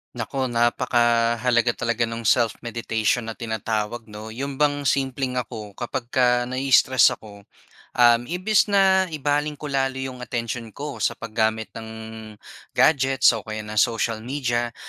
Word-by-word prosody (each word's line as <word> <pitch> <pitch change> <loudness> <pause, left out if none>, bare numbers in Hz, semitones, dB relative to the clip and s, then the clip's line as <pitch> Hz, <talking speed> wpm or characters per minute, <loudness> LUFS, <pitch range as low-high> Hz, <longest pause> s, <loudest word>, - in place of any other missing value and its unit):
Naku 130 +3 -2
napakahalaga 120 0 +2
talaga 115 -1 -1
no'ng 115 0 -6
self-meditation 115 0 0
na 115 - -5
tinatawag 110 0 -3
'no. 105 +1 -9
'Yon 135 +4 -5
bang 145 0 +1
simpleng 130 -1 -1
ako 110 -4 -5
kapag 120 0 -4
ka 125 0 +2 0.2
nai-stress 130 -1 +4
ako, 100 -2 -10 0.5
um, 120 -1 +5
imbis 185 +6 +2
na 190 -2 +4
ibaling 150 +1 0
ko 145 0 -7
lalo 135 -1 0
'yong 130 -1 -5
atensyon 115 -2 -5
ko 145 0 -6
sa - - 0
paggamit 110 0 -2
ng 110 -1 -9 0.9
gadgets 135 -3 +4
o 115 -3 -4
kaya 110 0 -5
ng 105 0 -4
social 115 -1 +1
media. 120 -1 -2
120 Hz, 135 wpm, -23 LUFS, 115-135 Hz, 0.9 s, um